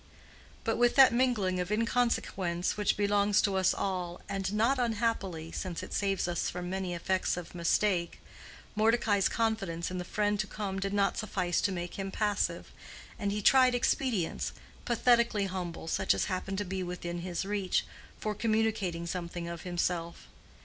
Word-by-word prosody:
But 225 -2 0
with 240 0 +4
that 265 -3 +8
mingling 230 -7 +1
of 180 +2 -2
inconsequence 210 -6 0
which 210 -2 +1
belongs 205 0 +3
to 200 -2 +1
us 190 -1 +3
all, 180 -3 -3
and 195 -1 -2
not 230 +6 +2
unhappily, 210 -8 -1
since 180 -3 -4
it - - -8
saves 195 -2 0
us 175 -1 -1
from 180 0 -5
many 190 -2 -2
effects 185 +1 0
of 175 -2 -7
mistake, 175 +1 +1 0.6
Mordecai's 215 -2 +3
confidence 195 -8 -1
in 185 - -3
the - - -3
friend 205 +2 0
to 190 - -1
come 195 -1 -4
did 195 +1 -2
not 200 -1 +1
suffice 185 -5 0
to 200 - +1
make 175 +1 -5
him 195 0 -2
passive, 205 0 -1 0.5
and 200 -2 -1
he 210 0 -2
tried 255 0 +6
expedients, 240 -7 0 0.3
pathetically 235 -3 +3
humble, 180 -3 -5
such 190 +3 +2
as - - 0
happened 190 +1 -3
to 205 - -1
be 190 +1 -3
within 175 -1 -4
his 175 +1 -3
reach, 200 -2 0 0.3
for 215 - -2
communicating 215 -6 0
something 170 0 -4
of 170 -1 -6
himself. 175 -1 -2
195 Hz, 165 wpm, -30 LUFS, 180-215 Hz, 0.6 s, that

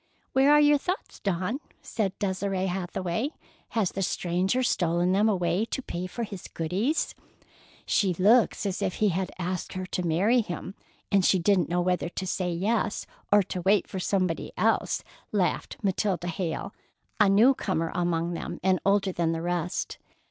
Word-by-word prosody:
"Where 270 +2 +5
are 295 - +7
your 295 -1 +5
thoughts, 370 +6 -4
Dawn?" 195 +6 -1 0.2
said 195 -4 -2
Desire 190 -1 -1
Hathaway. 185 +5 -2 0.5
"Has 205 -5 +2
the 195 - -3
stranger 185 +6 0
stolen 175 -5 +1
them 205 +3 +3
away 180 -1 +1
to 270 - -4
pay 180 -3 -4
for 235 +6 -4
his 200 -4 -7
goodies?" 195 - -1 0.7
"She 195 -4 +2
looks 215 +5 +4
as 195 -2 -2
if - - -1
he 215 - +2
had 185 +1 -2
asked 180 0 -3
her 185 -1 -4
to 185 - -3
marry 190 +9 +3
him, 185 -1 -6 0.4
and 195 -2 +4
she 190 - +4
didn't 180 -2 +2
know 175 +1 +1
whether 180 -1 0
to 185 - -5
say 180 -1 -1
yes 205 +5 0 0.3
or 205 0 +6
to 180 -1 -5
wait 195 +2 +3
for 190 - -5
somebody 185 -3 -1
else," - - +1 0.3
laughed 190 -4 0
Matilda 190 -2 0
Hale, 175 +3 -3 0.5
a 205 -2 +6
new 220 +7 +6
comer 165 -9 -2
among 175 -1 0
them, 170 - -5
and 185 0 +3
older 195 -1 +2
than 170 -2 0
the 165 - -3
rest. 175 0 -2
185 Hz, 170 wpm, -27 LUFS, 175-205 Hz, 0.7 s, are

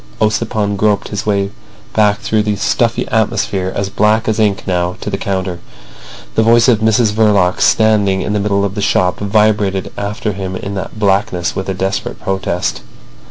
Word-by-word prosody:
Ossipon 105 -1 0
groped 105 0 +1
his 105 +1 -4
way 100 -1 0 0.4
back 105 -1 +2
through 110 -1 +1
the 105 0 -1
stuffy 115 +3 0
atmosphere, 100 -4 0
as 100 -1 -2
black 105 +3 +1
as 110 0 0
ink 105 -2 +1
now, 90 -1 -1
to - - -5
the - - -1
counter. 95 -2 -3 0.7
The - - +2
voice 115 +2 +4
of 120 -4 +4
Mrs 110 0 +2
Verloc, 105 -5 +2
standing 105 -3 +3
in 105 - -2
the 105 - +1
middle 100 -1 +1
of 100 - -3
the 105 - -3
shop, 90 -2 +1
vibrated 105 -2 +1
after 105 +1 -3
him 95 -1 -5
in 100 +1 -5
that 100 +3 -6
blackness 95 -4 0
with 95 0 -3
a 95 - -2
desperate 95 +1 -3
protest. 95 -2 -2
100 Hz, 175 wpm, -15 LUFS, 95-110 Hz, 0.7 s, voice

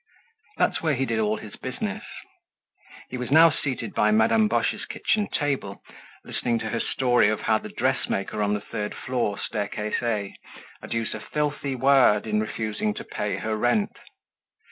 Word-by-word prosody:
That's - - +2
where 155 -3 +1
he 135 +1 0
did 115 -3 -1
all 110 0 +1
his 110 +1 -10
business. 205 +11 -4 1.1
He 125 - -4
was 125 - -4
now 160 +3 +7
seated 130 -6 -3
by 105 - +3
Madame 110 - +4
Boche's 215 - 0
kitchen 210 -2 0
table, 135 -9 -2 0.4
listening 120 -1 -1
to 110 -1 -3
her 115 - -1
story 125 -5 +3
of 110 - -1
how 110 -1 +2
the - - -8
dressmaker 100 +2 -1
on 105 0 +2
the 105 - -3
third 105 0 -4
floor, 120 -6 -1
staircase 105 -1 -2
A, 105 -5 -1 0.5
had - - -10
used 115 -1 -1
a 110 - -5
filthy 145 +1 -2
word 130 -5 +5
in 105 -1 +1
refusing 110 -1 -2
to - - -5
pay - - -3
her 110 0 -2
rent. 120 - +1
115 Hz, 165 wpm, -25 LUFS, 105-135 Hz, 1.1 s, now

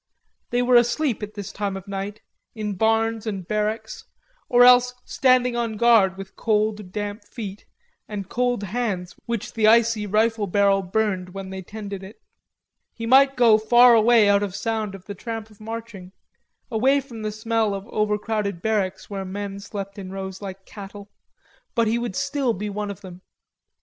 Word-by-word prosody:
They 245 0 +1
were 245 0 +5
asleep 240 +1 +1
at 210 0 -7
this 205 -3 -6
time 200 -1 -3
of 195 +1 -11
night, 200 +1 -5 0.3
in 210 -2 -3
barns 225 +2 +1
and 195 -5 -4
barracks, 215 +1 -2 0.5
or 245 0 +6
else 250 0 +6
standing 255 -2 +3
on 230 -2 -2
guard 210 -5 +4
with 195 0 -9
cold 210 -3 0
damp 205 +1 -4
feet, 205 -4 -8 0.4
and 200 -3 -5
cold 245 -1 0
hands 200 -4 -3
which 235 -3 -3
the 220 -2 +2
icy 225 -1 +4
rifle 215 +1 +1
barrel 200 +1 +3
burned 190 -1 -2
when 195 -1 -6
they 190 0 -5
tended 200 0 -7
it. 195 +3 -11 0.8
He 230 - -5
might 270 +3 +5
go 230 -3 +6
far 240 +3 +6
away 225 -1 +5
out 200 0 +4
of 200 -2 -3
sound 220 -3 -2
of 185 -1 -13
the 205 - -6
tramp 225 +1 -6
of 215 - -19
marching, 220 -4 -8 0.6
away 260 +5 +3
from 245 -5 -9
the 215 0 -2
smell 220 -1 0
of 195 +2 -7
overcrowded 210 -2 -1
barracks 190 -2 -1
where 195 -2 -5
men 200 +1 -5
slept 200 -1 -7
in 190 -1 -7
rows 190 0 -6
like 195 -1 -8
cattle, 200 0 -10 0.6
but 230 -2 +3
he 225 +2 +1
would 235 -5 -4
still 275 -4 0
be 205 +2 -4
one 205 0 -4
of 200 0 -7
them. 185 -2 -11
210 Hz, 175 wpm, -23 LUFS, 195-230 Hz, 0.8 s, or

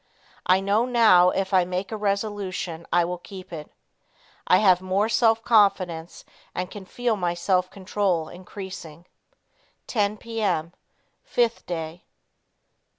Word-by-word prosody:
I 185 +1 +5
know 205 +4 +2
now 215 -8 +6
if 195 +1 -2
I 185 -1 +5
make 180 +2 -4
a - - -2
resolution 200 -5 -3
I 175 0 +4
will 180 0 -4
keep 185 -1 -11
it. 150 -2 -8 0.8
I 180 - +6
have 185 -3 +4
more 190 +3 +1
self 225 0 +3
confidence 185 -7 +2 0.3
and 180 0 -3
can 205 -2 -9
feel 240 +3 -1
my 175 -3 -1
self 185 0 +1
control 185 -4 -1
increasing. 180 -3 -9 0.8
10 210 -2 0
P. 225 +1 -5
M. 170 -4 0 0.6
5th 235 -1 +1
Day. 165 0 -5
185 Hz, 135 wpm, -25 LUFS, 175-210 Hz, 0.8 s, now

